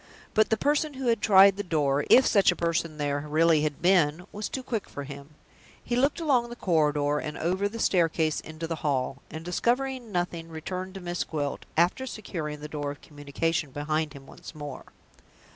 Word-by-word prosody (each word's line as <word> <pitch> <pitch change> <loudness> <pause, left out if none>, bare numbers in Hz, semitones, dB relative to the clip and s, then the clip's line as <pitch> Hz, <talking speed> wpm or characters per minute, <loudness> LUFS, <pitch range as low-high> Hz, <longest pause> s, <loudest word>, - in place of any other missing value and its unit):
But 215 - +3
the 220 - +2
person 295 +3 +1
who 260 -2 -1
had 230 -2 +1
tried 195 -1 +7
the - - -1
door 145 -5 +1
if 260 - +7
such 200 -3 +5
a - - -3
person 165 -2 -1
there 145 -1 -1
really 160 +1 +4
had 150 0 -2
been 175 -2 +3
was 210 +1 -4
too 260 - -5
quick 225 -5 -3
for 145 - -6
him. 140 +1 -10 0.5
He 240 - -2
looked 275 +6 +2
along 260 -7 +2
the 240 - -7
corridor, 150 -6 +1
and 150 0 -5
over 185 +5 0
the 230 - -7
staircase 165 -6 +2
into 155 +1 -7
the 165 0 -3
hall, 135 -2 -1
and, 160 +1 -8
discovering 245 +5 -1
nothing, 175 -2 -2
returned 185 +4 -6
to 195 - -7
Miss 175 0 -2
Gwilt, 145 -3 -4
after 180 +10 +2
securing 160 -10 -5
the 150 - -5
door 145 -1 -4
of 145 - -8
communication 150 +1 -2
behind 150 +2 -2
him 140 -2 -12
once 155 - -12
more. 145 -3 -7
165 Hz, 195 wpm, -27 LUFS, 150-205 Hz, 0.5 s, tried